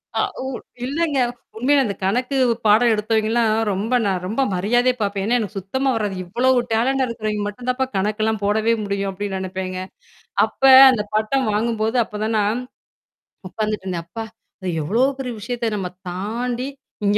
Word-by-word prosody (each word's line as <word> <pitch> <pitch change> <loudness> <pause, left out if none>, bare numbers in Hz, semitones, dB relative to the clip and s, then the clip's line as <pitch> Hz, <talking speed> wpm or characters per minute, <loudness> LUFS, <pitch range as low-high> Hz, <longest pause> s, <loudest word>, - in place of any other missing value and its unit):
அ - - +1 0.2
ஊ - - -5 0.4
இல்லங்க! 290 +1 0 0.4
உண்மையில 275 +4 +3
இந்தக் 200 -2 -5
கணக்கு 250 +8 0 0.3
பாடம் 230 +3 +5
எடுத்தவைங்க 220 +1 0
எல்லாம், 230 -2 +2 0.2
ரொம்ப 215 +6 -1
நா 200 - +2
ரொம்ப 220 +8 -1
மரியாதையா 240 +7 +2
பாப்பேன். 200 -1 -1
எனக்குச் 210 -2 -4
சுத்தமா 265 +9 -1
வராது. 205 -3 -1
"இவ்வளவு 250 +7 +2
டேலண்ட்டா 260 +4 +2
இருக்கிறவய்ங்க 215 -2 -3
மட்டும்தாப்பா 250 +5 -2
கணக்கெல்லாம் 215 +2 0
போடவே 220 +3 +2
முடியும்" 200 -1 -2
அப்படின்னு 195 0 -4
நெனப்பேங்க. 185 0 -4 0.7
அப்ப, - - -7 0.3
அந்தப் 210 -4 -2
பட்டம் 220 +5 +1
வாங்கும் 220 +1 0
போது, 225 +3 0
அப்பத் 210 0 -6
தான் 220 0 0
நான் 215 +5 0 0.9
உக்காந்துட்டுருந்தேன். 195 -5 -3
"அப்பா 225 +4 -6 0.3
இத 185 - -6 0.2
எவ்ளோ 215 +11 +1 0.2
பெரிய 250 -2 -4
விஷயத்த 235 +1 -2
நம்ம 190 -2 -2 0.2
தாண்டி 235 +7 -3 0.4
இங்க 205 - +3
220 Hz, 150 wpm, -21 LUFS, 200-245 Hz, 0.9 s, பாடம்